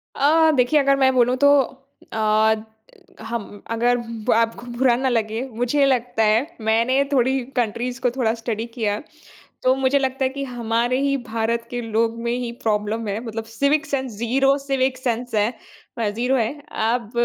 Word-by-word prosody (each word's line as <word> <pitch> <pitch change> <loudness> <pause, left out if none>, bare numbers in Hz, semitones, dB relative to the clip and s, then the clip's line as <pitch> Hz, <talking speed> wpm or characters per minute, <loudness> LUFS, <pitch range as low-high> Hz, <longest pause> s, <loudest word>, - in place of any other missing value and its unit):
अ, 315 +3 +4
देखिए 255 +4 +3
अगर 275 -1 +3
मैं 265 -1 +4
बोलू 250 0 +3
तो 285 - +7 0.6
अ, 220 0 +3 0.7
हम 225 0 -4 0.3
अगर 240 +2 +2
ब 230 -2 -3
आपको 230 +1 0
बुरा 250 -2 +4
ना 260 +1 0
लगे, 225 -1 -1
मुझे 245 +5 +1
लगता 245 -3 +1
है 215 +1 +4 0.3
मैंने 245 +5 +3
थोड़ी 265 0 +2 0.2
कंट्रीज़ 245 +1 -1
को 245 - +2
थोड़ा 235 -3 0
स्टडी 225 -1 -3
किया 215 -4 0
है। 210 - -5 0.6
तो 255 0 +4
मुझे 270 +1 +2
लगता 265 0 -1
है - - +3
कि 275 +1 -5
हमारे 240 0 -1
ही 275 0 +1
भारत 230 +1 -2
के 245 - -3
लोग 225 0 0
में 235 0 -1
ही 240 -1 -4
प्रॉब्लम 215 +1 -1
है, 205 +2 -2
मतलब 225 0 -5
civic 280 +7 0
sense 265 -4 -2
zero 270 +4 +2
civic 270 -2 -1
sense 245 -1 -3
है 215 +3 +2 0.5
अ, 225 -2 0
जीरो 245 +5 0
है। 230 -3 +1 0.3
अब 230 -1 0
240 Hz, 175 wpm, -22 LUFS, 225-265 Hz, 0.7 s, तो